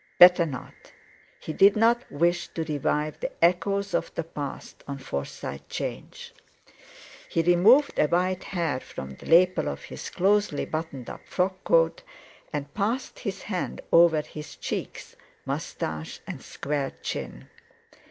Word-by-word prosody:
Better 180 -1 +8
not! 130 -5 -7 0.7
He 155 - -5
did 195 +5 +6
not 230 +2 +2
wish 175 +4 +1
to 165 - -1
revive 150 0 -1
the - - -3
echoes 195 +4 +2
of - - 0
the 165 - -1
past 145 -3 -7
on 140 -1 -4
Forsyte 70 - -6
'Change. - - -6 1.0
He 165 - +1
removed 200 - +5
a 150 - +5
white 180 +3 0
hair 165 -8 -1
from 65 - -8
the 65 - -12
lapel 180 +3 +5
of 70 - -6
his - - -7
closely 200 -4 +2
buttoned 155 -6 -5
up - - -9
frock 185 +1 -1
coat, - - +3 0.5
and 145 -2 -4
passed 225 +6 -2
his 200 -5 -5
hand 185 -4 -3
over 165 -2 +6
his 150 -1 -9
cheeks, - - -5 0.3
moustache, 80 0 -4
and - - -7
square 140 -2 -3
chin. 65 +2 -5
170 Hz, 140 wpm, -26 LUFS, 145-190 Hz, 1.0 s, Better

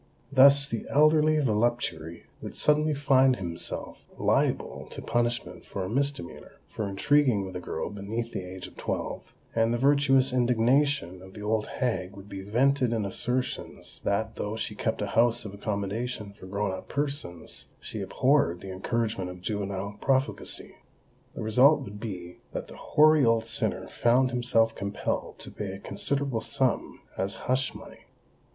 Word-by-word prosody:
Thus 140 +1 +7
the 115 -5 -4
elderly 155 +1 +5
voluptuary 110 - 0 0.2
would - - -7
suddenly 150 0 +3
find 135 -2 +4
himself 85 -5 -5
liable - - 0
to - - -8
punishment 120 0 -1
for 100 - -5
a 90 - -4
misdemeanour, 135 -6 -2
for 110 - -4
intriguing 120 0 +3
with 95 -1 -8
a - - -2
girl 85 0 -4
beneath 110 +4 -4
the - - -3
age 90 0 -8
of - - -12
twelve; - - -4 0.2
and 115 0 +2
the 120 - +1
virtuous 135 -1 +4
indignation 125 - +2
of 95 0 -13
the 105 - -8
old 110 0 0
hag 95 -7 -2
would 100 0 -11
be 95 -1 -7
vented 125 +4 +2
in 110 -3 0
assertions 125 +6 -3
that 110 +2 -1
though 105 +1 -3
she 110 -1 -3
kept 105 0 -2
a 100 - -4
house 115 +2 +3
of 100 - -6
accommodation 105 +2 -3
for 95 - -12
grown 100 +1 -1
up 95 - -7
persons, 140 - -4
she - - -6
abhorred 125 - +2
the 95 - -7
encouragement 105 0 -2
of 90 0 -9
juvenile 100 0 -3
profligacy. 135 0 -1 0.6
The - - -4
result 130 +7 +5
would 105 -5 -8
be 90 -6 -7
that - - -4
the - - -10
hoary 155 -1 +4
old 115 -1 +3
sinner 115 - -1
found 125 +2 +3
himself 120 -2 +2
compelled 100 +1 -3
to - - -11
pay 100 -3 -5
a - - -6
considerable 140 +1 -2
sum 130 0 -1 0.2
as 95 +1 -1
hush 130 +1 0
money. - - -12
115 Hz, 160 wpm, -28 LUFS, 100-135 Hz, 0.6 s, Thus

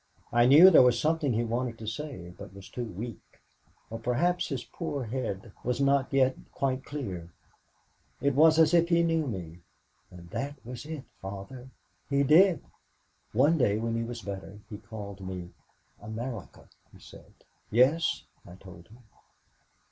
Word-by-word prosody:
I 120 0 +5
knew 160 +8 +9
there 160 - +8
was 125 -2 +4
something 155 0 +1
he 115 +2 +1
wanted 120 0 -2
to 110 - -9
say 110 - -6
but 100 +1 -11
was 100 -1 -11
too 125 - -4
weak, 110 0 -9 0.5
or 115 - -5
perhaps 150 +10 0
his 135 -5 -3
poor 145 +1 -5
head 115 -3 -4
was 125 +1 -1
not 140 -1 +2
yet 130 -1 +3 0.2
quite 130 -1 -1
clear. 95 - -6 0.9
It 140 0 +1
was 155 +3 +6
as 160 0 +5
if 170 0 +4
he 170 -1 +4
knew 165 -2 +1
me. 90 -7 -6 0.5
And 90 -1 -13
that 140 +1 -3
was 125 +4 -8
it, 155 -4 -6 0.2
Father. 100 +7 -8 0.4
He 140 0 +2
did. 170 +5 +5 0.7
"One 145 +8 +3
day 105 -5 +3
when 115 +1 -2
he 115 - -1
was 115 0 -6
better 100 0 -7
he 105 - -6
called 100 -3 -9
me. 90 -2 -6 0.5
'America?' 110 0 -7 0.2
he - - -16
said. - - -15 0.3
"'Yes,' 130 +9 +3 0.2
I 90 - -12
told 90 -2 -14
him. 120 +4 -18
120 Hz, 160 wpm, -28 LUFS, 105-140 Hz, 0.9 s, knew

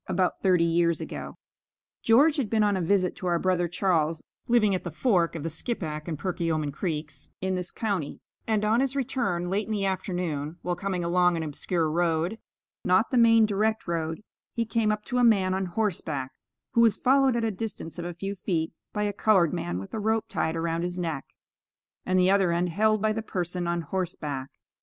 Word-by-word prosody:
(About 180 0 0
thirty 180 -3 +4
years 170 0 +2
ago.) - - -7 0.6
George 285 +8 +5
had 255 -7 -1
been 220 -1 +2
on 205 -1 +2
a 185 - -1
visit 185 +1 +1
to 185 - -4
our 175 -1 +2
brother 175 0 +1
Charles, 165 -3 0 0.2
living 225 -4 +4
at 185 - -2
the 175 - -4
fork 175 - +1
of 155 - -5
the 165 - -2
Skippack 155 -4 -4
and 160 -3 -3
Perkiomen 165 -3 -1
Creeks, 150 -3 -5
in 190 0 -1
this 180 -1 -3
county, 195 -10 -3 0.3
and 215 -1 +1
on 220 +2 +3
his 270 0 0
return, 230 -10 -1
late 205 +2 0
in - - -5
the 205 -2 0
afternoon, 175 -5 -2
while 175 0 -1
coming 185 -1 -2
along 180 0 +3
an 165 - -2
obscure 160 +2 -1
road, 170 +5 0 0.4
not 185 +5 +3
the 255 - +2
main 230 -1 +6
direct 215 +1 0
road, 165 +1 -2 0.3
he 230 -1 0
came 220 -1 +1
up 210 0 -3
to 250 -1 -1
a - - +3
man 195 -5 +4
on 190 0 -1
horseback, 175 - -2 0.4
who 235 - +3
was 230 -3 +4
followed 270 -1 +3
at 235 - 0
a 225 - +1
distance 190 -5 -6
of 170 - -4
a 175 -1 -5
few 195 +3 -4
feet 170 -4 -2 0.2
by 210 - -1
a 205 -1 -1
colored 195 -5 +3
man 85 +1 -2
with 95 +1 -8
a - - -2
rope 220 +1 +1
tied 160 -6 -1
around 165 0 -1
his 175 +1 -3
neck, 165 -6 -3 0.8
and 185 0 +2
the 185 +1 +4
other 195 -3 +3
end 175 +1 +1
held 215 +4 +2
by 215 0 +2
the 225 - -2
person 180 -4 -3
on 170 0 0
horseback. 150 -6 -4
185 Hz, 205 wpm, -27 LUFS, 170-215 Hz, 0.8 s, main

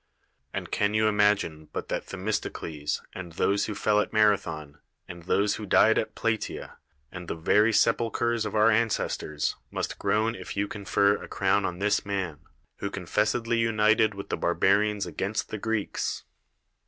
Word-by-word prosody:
And - - -5
can 105 +1 +1
you 110 0 +3
imagine 105 -7 +1
but - - -5
tliat - - -2
Themistocles, 90 -6 -3
and 90 -3 -8
those 100 +4 +1
who 105 - -4
fell 105 +1 +2
at 105 - -1
Marathon, 90 -9 +1 0.3
and 85 0 -9
those 100 +2 +1
who 105 - -7
died 110 +3 +5
at - - -4
Plata^a, 115 -1 -3 0.3
and 90 -2 -8
the - - -3
very 105 +7 +3
se]v 115 +1 +3
uk; - - -5
hers 120 -1 +1
of 105 0 -4
our 110 +1 +5
ancestors, 105 -9 0
must - - -4
groan 110 +3 +1
if 115 - -8
you 100 +1 +1
con 100 -1 -8
fer 100 +1 +3
a - - -8
crown 95 +1 +1
on 90 - -3
this 100 +2 +1
man, 95 -7 -3 0.4
who 100 - -3
confessedly 105 +5 0
united 110 -1 +3
with 100 - -8
the - - -1
Barbarians 100 +3 +2
against 95 +5 -3
the 110 - -5
Greeks? 110 -1 -2
105 Hz, 170 wpm, -27 LUFS, 95-110 Hz, 0.4 s, died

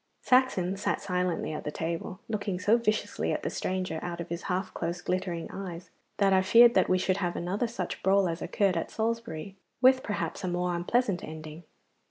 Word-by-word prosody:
Saxon 225 -8 +3
sat 200 - -1
silently 180 -4 -1
at 150 - -5
the - - -3
table, 165 +5 -4
looking 205 -4 -2
so 205 +4 +4
viciously 215 -2 0
at - - -2
the - - -2
stranger 185 -3 -2
out 175 -1 -5
of 170 - -5
his 170 0 -4
half 185 +2 -1
closed 170 +1 -4
glittering 180 -2 -2
eyes 180 -3 -7 0.3
that 195 -1 +4
I 190 - +5
feared 235 +5 +7
that - - +3
we 185 - +4
should 185 0 +1
have 175 -3 -1
another 195 +7 -1
such 210 -7 -5
brawl 195 0 +4
as 165 0 -3
occurred 200 -4 +1
at - - -2
Salisbury, 220 -5 -3 0.2
with 260 +1 +6
perhaps 205 -2 -3
a - - -1
more 180 0 0
unpleasant 185 +2 0
ending. 155 +1 -8
185 Hz, 195 wpm, -29 LUFS, 175-205 Hz, 0.3 s, feared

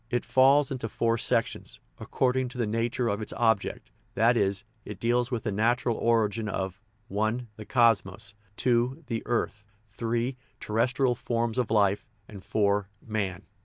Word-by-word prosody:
It 120 -1 -1
falls 135 +2 +4
into 125 -4 -3
four 115 +1 0
sections, - - -1 0.2
according 130 0 0
to 125 - -11
the 120 - +1
nature 115 +3 -1
of 105 0 -1
its 110 - -5
object; 110 -4 0 0.2
that 115 +3 +4
is, 100 -2 +1 0.2
it 105 -2 -8
deals 120 +1 +1
with 120 -3 -2
the 105 - -1
natural 115 +3 +1
origin 115 -2 +1
of 95 0 -4 0.3
(i) 110 +4 0
the 110 - -9
cosmos, 105 -5 +2 0.2
(2) 125 +5 +1
the 115 -3 -3
earth, 105 -3 -1 0.3
(3) 120 +4 -2 0.2
terrestrial 125 +4 +1
forms 115 0 -1
of 125 - 0
life, 105 +3 +2 0.2
and 100 -3 -11
(4) 100 -1 +1 0.2
man. 100 -4 -2
115 Hz, 155 wpm, -28 LUFS, 105-120 Hz, 0.3 s, falls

